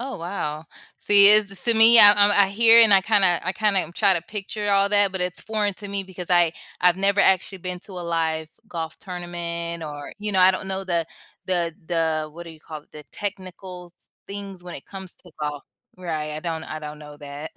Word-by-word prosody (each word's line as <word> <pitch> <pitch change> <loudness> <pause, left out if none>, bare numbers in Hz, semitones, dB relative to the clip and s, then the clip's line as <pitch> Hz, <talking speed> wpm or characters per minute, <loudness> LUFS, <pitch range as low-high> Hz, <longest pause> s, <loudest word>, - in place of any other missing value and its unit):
Oh, 260 +1 -6
wow. 160 -3 -5 0.3
See, 200 -1 +7
it's 210 -1 +5
s 195 +4 +1
me, 225 +1 +7
I'm 205 -1 +8
I'm 205 0 +4
I 200 -1 +4
hear, 225 +3 +5
and 220 -2 +5
I 195 - +5
kinda 190 -4 +2
I 185 - -1
kinda 205 -2 +1
m 170 -1 -7
try 200 0 +2
to 170 - -2
picture 205 +2 -5
all 200 0 +3
that, 205 -1 +2
but 190 - -5
it's 180 0 -3
foreign 210 -2 -2
to 205 +1 -6
me 200 0 -2
because 185 -1 -8
I 175 -2 +3 0.3
I've 180 0 +3
never 200 +1 +1
actually 190 +1 +1
been 180 0 -6
to 195 - -10
a 180 -1 -7
live 160 -2 -2 0.2
golf 165 -2 -6
tournament 170 -2 -6
or, 145 -2 -8
you 210 0 -4
know, 190 - +2
I 185 +1 +6
don't 190 +1 -5
know 190 0 -4
the 170 -3 -1 0.4
the 175 -3 -2
the 160 -2 -1
what 170 +2 -10
do 170 - -10
you 160 -1 -16
call 155 -1 -10
it? - - -36
The 150 - -11
technicals 185 -3 -8
s - - -19 0.2
things 195 -2 -8
when 175 -1 -9
it 135 - -11
comes 190 -2 -8
to 175 - -18
golf, 150 -1 -4 0.3
right? 160 -4 -5
I 155 - -6
don't 160 -1 -5
I 155 - -7
don't 150 0 -9
know 150 -1 -12
that. 145 +1 -9
180 Hz, 230 wpm, -22 LUFS, 165-200 Hz, 0.4 s, I'm